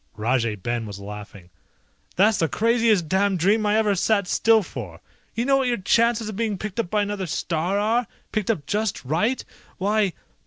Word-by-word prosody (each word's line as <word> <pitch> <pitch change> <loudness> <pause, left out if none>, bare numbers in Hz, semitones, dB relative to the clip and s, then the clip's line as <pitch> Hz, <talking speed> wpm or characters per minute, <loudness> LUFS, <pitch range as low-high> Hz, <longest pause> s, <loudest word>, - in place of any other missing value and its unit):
Rajay 115 0 0
Ben 115 +3 -3
was 100 -1 -8
laughing. 100 -2 -10 0.6
"That's 205 +3 +3
the 165 - +2
craziest 225 - +2
damned 195 +2 +1
dream 210 +5 +2
I 210 +1 +3
ever 215 -2 +2
sat 200 +1 +1
still 225 +3 +3
for. 105 - -8 0.4
You 230 +2 -1
know 275 0 +4
what 265 -1 +1
your 240 -1 +1
chances 230 +3 +2
of 215 - -5
being 215 -2 -1
picked 210 +2 -5
up 225 - -1
by 210 +1 +1
another 205 -2 -3
star 170 +5 -1
are? 225 +4 +1 0.2
Picked 215 -2 -2
up 165 -11 0
just 210 -5 -2
right? 180 - 0 0.3
Why 205 -1 +1
200 Hz, 185 wpm, -23 LUFS, 155-220 Hz, 0.6 s, know